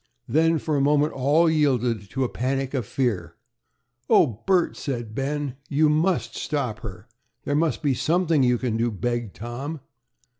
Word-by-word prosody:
Then 165 +2 +3
for 155 0 -2
a 140 - +2
moment 145 +2 +3
all 145 +6 +3
yielded 125 -9 +1
to 135 +4 -1
a - - +1
panic 135 +2 -2
of 125 -7 -2
fear. 120 -8 -1 0.7
"Oh, 115 -8 +4
Bert," 185 -3 +3
said 120 -5 -4
Ben, 140 +1 -3
"you 150 +2 +3
must 150 - +1
stop 130 -8 -2
her." 105 +1 -9 0.4
"There 145 - -2
must 160 +2 0
be 140 -2 +2
something 165 +2 +2
you 125 -1 +3
can 120 -2 -2
do," 115 +1 +1
begged 120 0 -3
Tom. 130 +8 -5
135 Hz, 160 wpm, -24 LUFS, 120-150 Hz, 0.7 s, Oh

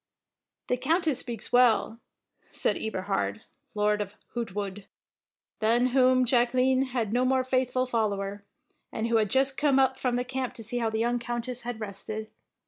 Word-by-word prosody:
"The 250 - 0
Countess 315 +2 +1
speaks 235 -3 -6
well," 235 -2 +4 0.5
said - - 0
Eberhard, 200 +1 -2 0.3
Lord 210 0 +2
of 205 0 -6 0.2
Hoogtwoude, 205 -4 -4 0.7
than 230 +3 +3
whom 255 -1 +4
Jacqueline 255 +2 +3
had 240 -5 -2
no 250 +1 +2
more 260 0 +2
faithful 255 0 0
follower, 205 -4 -2 0.5
and 225 +1 -2
who 230 - +3
had 215 -2 +1
just 270 +3 +2
come 285 -3 +3
up 265 -1 +3
from 250 -2 0
the 245 0 -1
camp 260 0 -3
to 225 - -6
see 245 +3 0
how 230 -1 0
the 220 - -2
young 240 +2 +1
Countess 240 +1 -4
had 240 -1 -5
rested. 215 +1 -6
240 Hz, 160 wpm, -27 LUFS, 220-255 Hz, 0.7 s, well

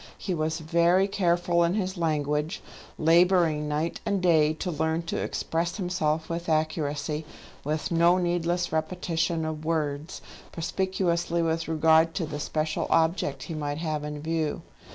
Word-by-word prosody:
He 190 - -3
was 160 -1 -1
very 170 +4 +3
careful 175 -3 +2
in 170 +3 +1
his 190 -2 -1
language, 150 0 -1 0.3
labouring 165 -2 +3
night 150 +3 -2
and 200 -3 0
day 160 -4 +4
to 175 +3 -4
learn 160 +1 -1
to 165 - -3
express 170 +3 -2
himself 165 -5 -1
with 170 0 -4
accuracy, 155 -1 -1 0.4
with 155 +3 -2
no 170 +2 +4
needless 175 0 0
repetition 165 0 -1
of 155 -1 -4
words, 155 -1 -2 0.3
perspicuously 170 -1 -1
with 165 0 -1
regard 160 +1 +4
to 185 -4 -1
the 145 -1 -5
special 155 +1 -2
object 160 -5 +1
he 170 - -6
might 145 -2 -3
have 155 -2 -2
in 150 0 -5
view. 160 -1 -1
165 Hz, 145 wpm, -27 LUFS, 155-175 Hz, 0.4 s, day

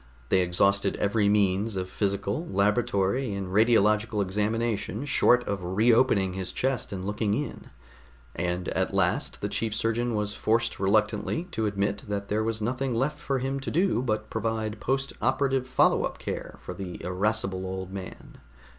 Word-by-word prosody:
They 95 - +4
exhausted 100 +3 +2
every 100 0 +2
means 100 +1 +2
of 90 -1 -2
physical, 100 - -2
laboratory 100 +3 +1
and 95 -2 -4
radiological 105 0 +3
examination 110 +6 -1
short 125 -2 +3
of 100 -2 -2
re 100 +7 +3
opening 105 -6 +3
his 95 -1 -4
chest 130 -2 -1
and 95 -2 -5
looking 105 0 0
in, 145 - -5 0.7
and 90 0 -2
at - - -1
last - - +1
the - - -1
chief 110 -2 -2
surgeon 115 +1 0
was 105 -1 -1
forced 115 +3 0
reluctantly 105 - +1
to 110 -8 -1
admit 100 0 -1
that 100 -1 -3
there 110 +1 +1
was 110 -1 -2
nothing 125 +2 -1
left 135 +6 0
for 135 - -1
him 135 +2 -2
to 135 - -5
do 175 -6 +2
but 110 -3 -2
provide 110 -1 -2
post 135 +5 -1
operative 130 0 +1
follow 130 - +3
up - - -3
care - - -5
for - - -6
the 90 -1 -7
irascible 95 +1 0
old 95 0 -5
man. 95 -1 -9
105 Hz, 165 wpm, -27 LUFS, 100-120 Hz, 0.7 s, They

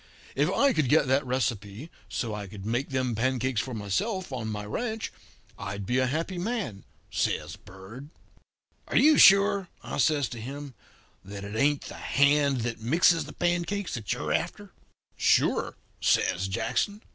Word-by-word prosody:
If - - +1
I 280 -2 +3
could 150 - +1
get 150 0 +4
that 135 +2 +3
recipe, 115 +1 -2 0.2
so 115 -3 -3
I 105 -1 -5
could 95 0 -10
make 120 +5 -1
them 130 -3 -1
pancakes 130 0 0
for 130 -3 -6
myself 180 - -2
on 115 -4 -3
my 105 -1 -4
ranch, 220 - -3 0.5
I'd 100 0 -5
be 125 +5 +1
a 130 - +2
happy 165 +6 -2
man,' 190 - -3 0.3
says - - -1
Bird. 100 +10 -12 0.8
"'Are - - -5
you 305 0 +6
sure,' 195 -1 +6
I - - -5
says 145 -1 +2
to 115 - -7
him, 140 +3 -7 0.5
'that 100 +1 -8
it 100 +2 -6
ain't 145 +5 +2
the - - -8
hand 140 -2 +2
that 115 -1 -4
mixes 165 +7 +3
the - - -10
pancakes 175 +3 -1
that 110 -5 -4
you're - - -1
after?' - - -3 0.5
"'Sure,' - - +2 0.2
says 95 +1 +2
Jackson. 120 - -1
130 Hz, 160 wpm, -27 LUFS, 110-165 Hz, 0.8 s, you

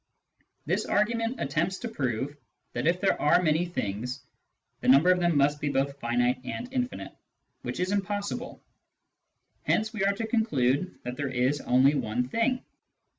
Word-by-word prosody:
^ - - -36 0.2
This - - 0
argument 230 +3 0
attempts 165 +7 -1
to 245 - -5
prove 135 - -2 0.4
that, - - -1
if 175 +2 +2
there 195 - +1
are 150 - +5
many 165 0 +2
things, 125 - -4 0.6
the - - -4
number 140 +8 +7
of 180 - +3
them 170 -3 +2
must 145 +1 +2
be 145 - 0
both 140 0 -1
finite 120 +1 +1
and 235 - -5
infinite, 250 -1 -3 0.5
which - - -5
is 180 +1 0
impossible; 205 +4 -3 1.0
hence 220 +1 0
we 210 -3 -1
are 200 +1 +3
to 225 +3 -3
con 225 0 +2
clude 140 - +1
that 125 +1 -5
there 140 -2 -2
is 130 +3 +1
only 130 +3 +4
one 125 -3 -1
thing. 250 - 0
155 Hz, 170 wpm, -28 LUFS, 130-205 Hz, 1.0 s, number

